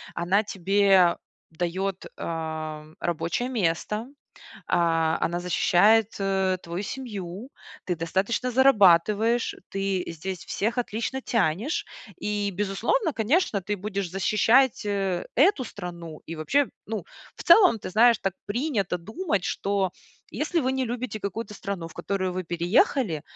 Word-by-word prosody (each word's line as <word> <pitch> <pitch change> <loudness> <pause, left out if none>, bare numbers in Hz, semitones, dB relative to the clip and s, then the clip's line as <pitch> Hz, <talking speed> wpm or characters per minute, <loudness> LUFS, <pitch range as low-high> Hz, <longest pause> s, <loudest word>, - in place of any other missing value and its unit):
Она 185 +5 +2
тебе 195 -2 +3 0.3
даёт, 180 +3 -3
э, 160 -2 -4 0.2
рабочее 170 +8 -2
место. 210 0 -1 0.6
А, 165 -1 +2
она 170 +1 0
защищает, 200 +5 +3
э, 190 -1 0
твою 170 +3 -4
семью, 210 -1 -6 0.3
ты 180 - -1
достаточно 190 +9 -1
зарабатываешь, 220 -2 +4
ты 195 -1 -1
здесь 185 +3 -6
всех 225 +5 -2
отлично 240 +3 -2
тянешь. 225 - 0 0.3
И, 205 -1 -1
безусловно, 210 - 0
конечно, 235 - +1
ты 205 +3 -2
будешь 200 -2 -4
защищать, 225 +7 +3
э, 195 -3 -1
эту 300 - +4
страну. 170 -7 -8
И 165 - -5
вообще, 270 - +1 0.2
ну, 220 0 -4 0.3
в - - -9
целом, 350 - +7
ты 195 - -7
знаешь, 230 +3 +5
так 195 -2 -2
принято 205 - -1
думать, 220 - -2
что 195 -2 -1 0.4
если 315 +3 -1
вы 260 -2 0
не 265 0 0
любите 240 -2 -4
какую-то 210 +2 -5
страну, 195 -4 -5
в 165 - -12
которую 185 -2 -2
вы 185 +1 -3
переехали,- 175 - +1
200 Hz, 130 wpm, -26 LUFS, 175-230 Hz, 0.6 s, целом